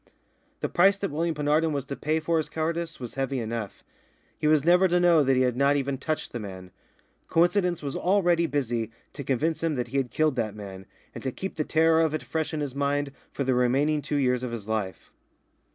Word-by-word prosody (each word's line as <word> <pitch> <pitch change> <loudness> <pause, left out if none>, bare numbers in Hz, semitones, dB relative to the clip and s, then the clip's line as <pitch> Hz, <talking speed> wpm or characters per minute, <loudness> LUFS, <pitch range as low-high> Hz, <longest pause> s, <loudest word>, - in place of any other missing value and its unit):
The - - 0
price 195 +3 +4
that 195 -1 -3
William 165 +2 -1
Penarden 150 +2 +1
was 140 -2 -2
to 140 - -5
pay 155 +3 0
for 165 +1 0
his 155 - -1
cowardice 165 +1 -2
was 120 -3 -7
heavy 135 0 -2
enough. 115 -3 -5 0.5
He 150 - -1
was 155 -1 +4
never 180 +2 +5
to 180 0 +2
know 175 -3 +5
that 135 -1 +3
he 130 - +3
had 125 -2 +1
not 140 +2 +3
even 140 -1 -1
touched 155 -1 -3
the 120 - -4
man. 95 -3 -8 0.6
Coincidence 175 0 +2
was 140 -1 -3
already 175 -3 +2
busy 120 -7 -1 0.2
to 140 - -6
convince 145 +5 0
him 165 -2 0
that 125 -2 -3
he 135 - -2
had 135 -3 0
killed 155 -2 +1
that 110 -3 -1
man, 95 -2 -9 0.3
and - - -8
to 130 - -1
keep 190 +8 -5
the 155 - 0
terror 160 +1 +3
of 160 -1 +1
it - - -4
fresh 160 -1 -2
in 155 - -3
his 140 -3 -3
mind 140 0 0 0.2
for 140 - -2
the 130 -1 +1
remaining 135 +5 +2
two 145 - -3
years 125 -3 +2
of 125 -2 -4
his 110 -3 -6
life. 105 -5 -3
145 Hz, 225 wpm, -26 LUFS, 125-160 Hz, 0.6 s, never